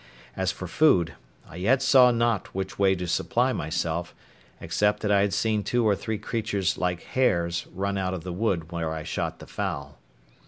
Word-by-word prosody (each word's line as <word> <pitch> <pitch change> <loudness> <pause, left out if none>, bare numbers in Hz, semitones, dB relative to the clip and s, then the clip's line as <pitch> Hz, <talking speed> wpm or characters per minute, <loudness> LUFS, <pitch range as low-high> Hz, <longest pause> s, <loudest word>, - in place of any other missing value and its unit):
As 95 -1 0
for 95 - -7
food, 90 - +3 0.3
I 80 - -11
yet 115 +9 +3
saw 130 -2 +7
not 115 -6 0
which 95 0 -4
way 95 -1 +4
to 90 0 -4
supply 125 +8 +1
myself, 85 +1 -2 0.4
except 105 +6 0
that 105 - 0
I 100 -1 +5
had 100 0 +1
seen 105 +2 +1
two 120 0 +1
or 105 - +4
three 110 +2 -3
creatures 105 -3 -1
like 90 -1 -2
hares 85 -9 0
run 100 +1 -2
out 95 0 -1
of 85 - -7
the 90 - -5
wood 90 -5 -1
where 85 -2 -2
I 80 -1 -4
shot - - -3
the - - -11
fowl. 70 -2 -5
95 Hz, 190 wpm, -26 LUFS, 85-110 Hz, 0.4 s, saw